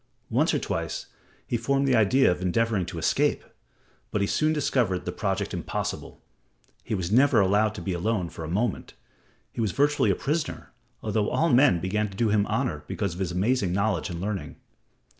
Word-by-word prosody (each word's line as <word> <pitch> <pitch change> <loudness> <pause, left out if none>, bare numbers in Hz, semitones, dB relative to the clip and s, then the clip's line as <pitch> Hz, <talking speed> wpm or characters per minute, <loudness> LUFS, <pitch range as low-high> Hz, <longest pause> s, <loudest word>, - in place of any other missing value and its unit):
Once - - +3
or - - +1
twice - - -3 0.4
he - - -2
formed 135 +4 +1
the 130 - +4
idea 115 +2 +4
of 90 - -3
endeavoring 95 0 0
to 85 - -6
escape, 80 - +1 0.7
but 105 - -1
he 100 - +2
soon 155 +9 +1
discovered 125 - 0
the 90 - -2
project 100 +1 -2
impossible. 90 - -4 0.6
He 110 - -2
was 90 -1 -3
never 130 +1 +5
allowed 105 +2 +2
to - - -6
be 95 - -2
alone 90 0 -1
for 80 - -8
a - - -5
moment; 105 +8 -2 0.6
he - - -4
was 105 -4 0
virtually 145 +1 +2
a - - +3
prisoner, 150 +3 -3 0.3
although 105 -1 0
all 165 - +1
men 125 -8 +5
began 105 +4 -1
to 95 - -12
do 115 -1 +2
him 105 -1 +2
honor - - -1
because 100 -5 -2
of 90 - -9
his 95 -3 -1
amazing 95 0 +1
knowledge 100 -3 0
and 85 -1 -5
learning. 100 +1 -4
105 Hz, 190 wpm, -26 LUFS, 95-120 Hz, 0.7 s, never